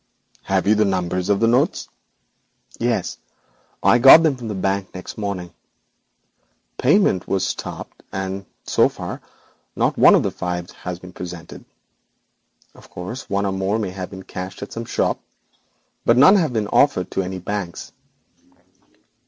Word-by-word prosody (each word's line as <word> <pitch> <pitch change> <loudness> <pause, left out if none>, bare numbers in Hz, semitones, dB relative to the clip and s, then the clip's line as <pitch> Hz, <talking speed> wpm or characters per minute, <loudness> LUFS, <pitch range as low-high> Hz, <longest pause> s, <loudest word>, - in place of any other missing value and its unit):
'Have 95 -1 +1
you 105 - +5
the 110 0 +3
numbers 90 -2 -1
of 100 -1 +3
the 115 - +3
notes?' 120 +2 +1 0.9
'Yes; - - -1 0.6
I 120 - +5
got 135 +6 +9
them 155 -4 +2
from 120 -3 -8
the 105 - -4
Bank 95 0 -2
next 90 - -8
morning. 95 -5 -4 1.3
Payment 140 - +3
was 95 -1 0
stopped, - - -6
and 95 0 -4 0.2
so - - +3
far - - -7 0.5
not - - 0
one - - +8
of - - +3
the - - -1
five 90 -1 -4
has 90 -1 -6
been 90 0 -13
presented. 90 -2 -9 1.1
Of - - -17
course, 95 +9 -7
one 100 0 0
or 100 - 0
more 95 +2 -1
may 105 -4 -3
have 95 -1 -6
been 95 0 -9
cashed 95 +1 -7
at 100 - -9
some 115 0 -5
shop, - - -1 0.8
but 115 - +3
none 165 +10 +8
have 165 -8 +2
been 110 -3 -1
offered 140 -10 +2
to - - 0
any 95 0 -4
of 90 - -8
the - - -3
banks.' 100 -5 -5
95 Hz, 160 wpm, -21 LUFS, 90-110 Hz, 1.3 s, got